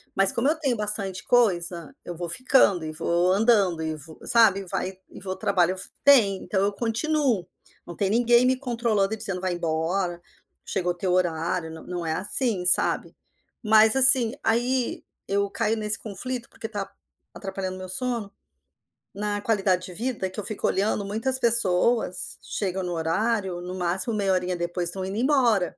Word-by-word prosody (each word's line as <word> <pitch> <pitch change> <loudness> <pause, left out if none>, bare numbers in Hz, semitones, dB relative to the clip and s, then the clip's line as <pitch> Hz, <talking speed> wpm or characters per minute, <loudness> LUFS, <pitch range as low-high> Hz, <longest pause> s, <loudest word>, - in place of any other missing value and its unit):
Mas 195 0 +6
como 240 +4 -1
eu 315 - +2
tenho 265 -6 -1
bastante 200 -3 -1
coisa, 175 -9 0
eu 175 - -7
vou 175 0 -6
ficando 200 -5 +2
e 155 - -5
vou 170 +3 0
andando 200 -6 +2
e 160 0 -3
vou 155 +2 -11
sabe, 220 -4 +4
e - - -10
vai 185 +2 -4
e - - -13
vou 190 -1 -5
trabalho 185 -1 0
f 185 - 0
tem, 225 -9 +5
então 190 -2 -2
eu 205 - 0
continuo. 235 - -1 0.4
Não 175 - -9
tem 195 -1 -1
ninguém 240 +2 +3
me 255 0 +1
controlando 230 -6 -1
e - - -4
dizendo: 190 -3 -5
"Vai 185 -1 -2
embora, 175 +2 -3 0.4
chegou 180 -2 -2
teu 180 +1 -3
horário". 170 -1 -2
Não 160 - -11
não 175 -2 -6
é, 160 - -2
assim, 200 0 0
sabe. 180 - +4 0.5
Mas, 220 +2 +5
assim 260 -3 +8
aí 245 +2 -1 0.2
eu 200 0 -1
caio 225 +1 -1
nesse 215 0 +1
conflito, 235 +4 -6
porque 225 - -8
tá 200 -2 -5 0.4
atrapalhando 190 -1 -6
meu 185 0 -9
sono, 235 -1 -3 0.8
na 205 +1 -4
qualidade 195 -5 0
de 180 - -10
vida, 225 -3 -3
que 190 - -8
eu - - -5
fico 215 - -3
olhando 200 +1 -1
muitas 230 +6 0
pessoas 225 -3 +3
chegam 190 -2 -3
no 180 - -4
horário, 185 +3 -2
no 180 +1 -7
máximo 185 +6 -1
meia 195 -2 0
horinha 180 0 -2
depois 175 0 -3
tão 190 0 -4
indo 195 +2 -6
embora. 240 -7 +1
195 Hz, 175 wpm, -24 LUFS, 180-230 Hz, 0.8 s, assim